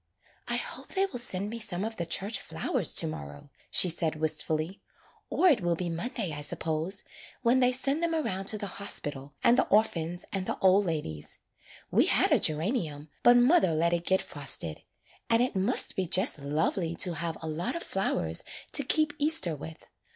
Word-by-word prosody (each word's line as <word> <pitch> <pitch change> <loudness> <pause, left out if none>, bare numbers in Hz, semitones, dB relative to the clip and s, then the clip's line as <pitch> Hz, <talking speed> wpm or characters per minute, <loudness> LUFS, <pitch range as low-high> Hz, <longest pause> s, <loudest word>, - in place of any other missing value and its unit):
''I - - +5
hope - - -4
they 385 +1 +2
will 265 -11 -4
send 205 -3 -1
me 230 - -6
some 200 -4 -1
of 225 0 -6
the 170 - -4
church 195 +6 0
flowers - - -1
to - - +5
morrow,'' 75 - -8 0.2
she - - +5
said 165 -2 0
wistfully. 155 +3 -2 0.5
'*Or 370 - +2
it 275 - +4
will 175 -1 0
be 175 +1 -4
Monday, 190 0 -3
I 145 - -5
suppose, 160 +5 -2 0.4
when 245 +2 +3
they 250 -1 +3
send 275 +4 0
them 335 -1 0
around 195 -12 -3
to 215 - +1
the 205 - -5 0.2
hospital, 145 -7 -3
and 240 - +4
the - - +1
orphans, 175 -5 0
and 190 -1 -3
the - - -3
old 190 +1 +3
ladies. 80 - -5 0.5
We - - +3
had - - +4
a - - +4
gera 155 +1 +1
nium, 155 - -4
but 240 0 +6
mother 245 - +3
let 170 +2 +1
it 170 -1 -1
get 190 0 +2
frosted. 125 - +1 0.5
And 230 - +3
it 250 - -3
must 195 +7 +2
be 185 -2 -2
just 185 -2 +2
lovely 160 +4 -2
to 175 - +4
have 165 0 -3
a 160 - -7
lot 160 - -2
of 340 - -4
flowers 85 - -2 0.3
to 285 - +5
keep 300 +3 +1
Easter 290 - +2
with. 155 +2 -10
180 Hz, 195 wpm, -28 LUFS, 155-235 Hz, 0.5 s, but